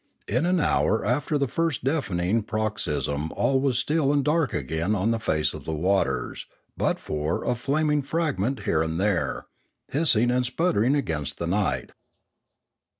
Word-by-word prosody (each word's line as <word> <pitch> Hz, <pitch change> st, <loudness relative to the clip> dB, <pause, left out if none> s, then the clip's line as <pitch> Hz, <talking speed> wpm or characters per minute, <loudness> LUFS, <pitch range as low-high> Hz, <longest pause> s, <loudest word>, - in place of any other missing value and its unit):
In 125 Hz, +10 st, +1 dB
an 180 Hz, 0 st, +2 dB
hour 110 Hz, -7 st, +2 dB
after 130 Hz, +6 st, +1 dB
the 140 Hz, -1 st, +1 dB
first 165 Hz, 0 st, -1 dB
deafening 115 Hz, -, 0 dB
paroxysm 80 Hz, -9 st, -2 dB
all 135 Hz, -1 st, +1 dB
was 135 Hz, -4 st, +1 dB
still 145 Hz, +1 st, +1 dB
and 145 Hz, -2 st, +1 dB
dark 155 Hz, -2 st, +2 dB
again 80 Hz, +9 st, -1 dB
on 105 Hz, +3 st, +1 dB
the 115 Hz, -, 0 dB
face 75 Hz, -8 st, 0 dB
of -, -, -8 dB
the 80 Hz, -, -2 dB
waters, 95 Hz, +5 st, 0 dB, 0.3 s
but -, -, 0 dB
for 75 Hz, +2 st, -2 dB
a -, -, +1 dB
flaming 150 Hz, +4 st, +1 dB
fragment 140 Hz, -, -1 dB
here 80 Hz, -, +1 dB
and 80 Hz, +1 st, -1 dB
there, 100 Hz, -3 st, 0 dB, 0.4 s
hissing 125 Hz, -6 st, +3 dB
and 125 Hz, 0 st, +2 dB
sputtering 125 Hz, -, +1 dB
against 75 Hz, -, -2 dB
the 85 Hz, -, -3 dB
night. 85 Hz, -8 st, -1 dB
115 Hz, 155 wpm, -25 LUFS, 85-140 Hz, 0.4 s, hissing